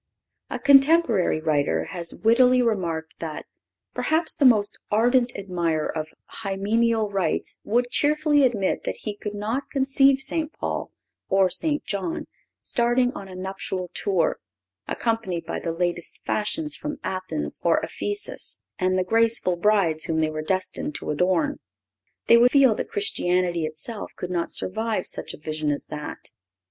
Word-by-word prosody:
(531) - - -4
A - - -25 0.3
contemporary 220 - 0
writer 155 -3 +1
has 170 -2 +2
wittily 250 +3 +5
remarked 170 -9 -1
that 160 -2 -6 0.5
"perhaps 320 +1 +1
the 285 - +2
most 215 -5 +4
ardent 240 +3 +3
admirer 170 -6 -2
of 155 -1 -3 0.3
hymeneal 215 +2 0
rites 195 -3 -1
would 245 +3 +1
cheerfully 300 0 +3
admit 215 -7 +1
that - - -3
he 210 -2 -4
could 205 0 -6
not 225 +7 -3
conceive 270 0 +3
St. 310 +3 -2
Paul - - -4 0.4
or 190 -1 +3
St. 300 - +1
John 205 - -3 0.4
starting 245 +1 +1
on 195 - -8
a 185 - -10
nuptial 185 -1 -4
tour, 190 -5 0 0.5
accompanied 220 -8 -2
by 165 - -4
the 165 - -3
latest 175 0 -2
fashions 300 +9 -1
from 295 -1 -5
Athens 185 +10 -3
or - - +3
Ephesus, 410 0 -2 0.2
and 185 0 +1
the 185 - +2
graceful 225 -2 +2
brides 175 -5 +2
whom 160 - -1
they 155 -1 +1
were 155 0 -4
destined 185 -3 -2
to - - -4
adorn. 180 +3 +1 0.7
They 235 - +7
would 245 +1 +6
feel 270 -3 +5
that - - -5
Christianity 180 - 0
itself 160 +8 -6
could 180 - -6
not 170 -2 -1
survive 220 0 -1
such - - -4
a - - -16
vision 155 0 -3
as 145 - -2
that. 150 -1 -7
200 Hz, 150 wpm, -24 LUFS, 175-245 Hz, 0.7 s, They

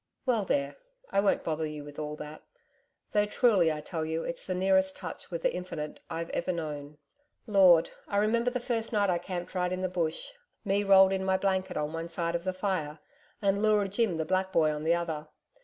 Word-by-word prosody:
Well, 230 -6 +1
there! 140 -4 -1 0.3
I - - +2
won't 200 0 +2
bother 155 0 -1
you 150 -1 -7
with 145 0 -10
all 150 0 -4
that 150 0 -9 0.7
though, 210 -1 +2
truly, 205 -7 +3
I 150 -1 -4
tell 160 +1 -4
you, 160 +1 -2
it's 255 0 -5
the 185 - -1
nearest 190 0 +2
touch 180 -4 -8
with 170 -2 -5
the - - +2
Infinite 170 -4 -5
I'VE 165 +1 -4
ever 175 - -1
known.... 150 -3 -5 0.5
Lord! 190 -6 +5 0.2
I 200 - -1
remember 230 +4 +2
the 250 0 -2
first 235 -2 -2
night 205 -4 +2
I 175 - +1
camped 175 0 -5
right 180 -1 0
in 185 0 -2
the - - +2
Bush 175 - -2 0.3
me 200 +1 +2
rolled 195 -1 +6
in 190 0 -1
my 190 0 +2
blanket 190 -2 -1
on 150 +1 -2
one 165 +1 -4
side 170 0 -2
of 170 +1 -3
the 185 - +1
fire, 185 -6 -2 0.5
and 200 0 +2
Leura 210 -2 +3
Jim 200 -3 0
the 160 - -1
black 190 +2 0
boy 155 -4 +3
on 150 +1 -4
the 165 +1 +4
other. 160 -3 -3
180 Hz, 215 wpm, -29 LUFS, 160-195 Hz, 0.7 s, rolled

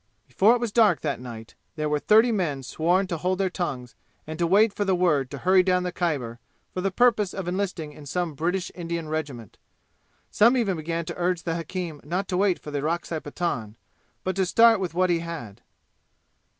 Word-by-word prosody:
Before 200 - +4
if - - -2
was 235 -3 -2
dark 220 -2 +4
that 145 -5 -2
night 115 -3 -9 0.2
there 155 -2 -2
were 150 0 0
thirty 220 +8 +5
men 160 -10 -1
sworn 175 +9 +1
to 175 -3 -3
hold 185 +3 -1
their 190 -1 0
tongues 130 -9 -4 0.3
and 160 +1 -7
to 170 - +2
wait 205 +4 +4
for 205 - -1
the 190 -2 +1
word 155 -7 +1
to 140 - -7
hurry 185 +6 +4
down 180 0 +1
the 180 - -2
Khyber 140 -11 -2 0.3
for 185 - -3
the 195 - +1
purpose 215 -2 +2
of 190 -3 -5
enlisting 180 -4 -3
in 145 0 -12
some 175 +2 -2
British 175 +5 -2
Indian 170 -2 -4
regiment. 145 -9 -5 0.7
Some 235 +5 +5
even 200 -7 0
began 165 +1 -3
to - - -5
urge 175 -1 0
the 165 - -2
hakim 165 -2 -5
not 180 +6 -2
to 180 - 0
wait 190 -2 +2
for 150 - -10
the 145 - -2
Orakzai 165 +1 -2
Pathan, 145 -9 -4 0.5
but 185 - -2
to 190 - +2
start 230 +2 +5
with 180 -4 -4
what 185 0 +2
he 170 - +2
had. 165 -12 -7
175 Hz, 205 wpm, -25 LUFS, 150-190 Hz, 0.7 s, thirty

